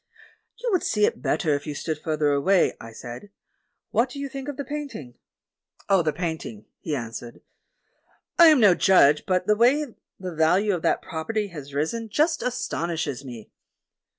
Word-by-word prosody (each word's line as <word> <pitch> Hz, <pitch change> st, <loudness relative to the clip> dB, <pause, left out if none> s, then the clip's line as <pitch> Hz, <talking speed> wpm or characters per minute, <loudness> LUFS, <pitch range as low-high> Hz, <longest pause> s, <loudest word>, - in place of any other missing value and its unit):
"You -, -, -3 dB
would 370 Hz, -, +2 dB
see 210 Hz, -1 st, +2 dB
it -, -, -2 dB
better 160 Hz, -8 st, +1 dB
if 145 Hz, 0 st, -3 dB
you 150 Hz, -, -4 dB
stood 155 Hz, +1 st, -3 dB
further 155 Hz, -2 st, 0 dB
away," 170 Hz, +7 st, +3 dB
I 115 Hz, -, -9 dB
said; 120 Hz, -, -9 dB, 0.6 s
"what 245 Hz, +3 st, +2 dB
do 255 Hz, -, -9 dB
you 280 Hz, 0 st, -4 dB
think 270 Hz, 0 st, -7 dB
of 290 Hz, -2 st, -5 dB
the 280 Hz, -, -4 dB
paint 295 Hz, 0 st, -5 dB
ing?" 125 Hz, -4 st, -10 dB, 0.7 s
"Of 190 Hz, -4 st, +3 dB
the 155 Hz, -, +2 dB
painting," 160 Hz, -, -5 dB
he 155 Hz, -, -3 dB
answered, 120 Hz, -1 st, -7 dB, 1.0 s
"I 340 Hz, -, +10 dB
am 305 Hz, -4 st, +6 dB
no 205 Hz, -5 st, +7 dB
judge, 150 Hz, -6 st, +4 dB
but 185 Hz, -1 st, +1 dB
the 210 Hz, -, +3 dB
way 250 Hz, +4 st, +2 dB, 0.3 s
the 185 Hz, -2 st, -5 dB
value 180 Hz, +6 st, +3 dB
of 175 Hz, -, -2 dB
that -, -, +1 dB
property 205 Hz, +6 st, -3 dB
has 145 Hz, -5 st, -9 dB
risen 220 Hz, +10 st, -2 dB
just 315 Hz, +7 st, +1 dB
astonishes 165 Hz, -, -3 dB
me." 120 Hz, -5 st, -10 dB
180 Hz, 180 wpm, -25 LUFS, 145-235 Hz, 1.0 s, I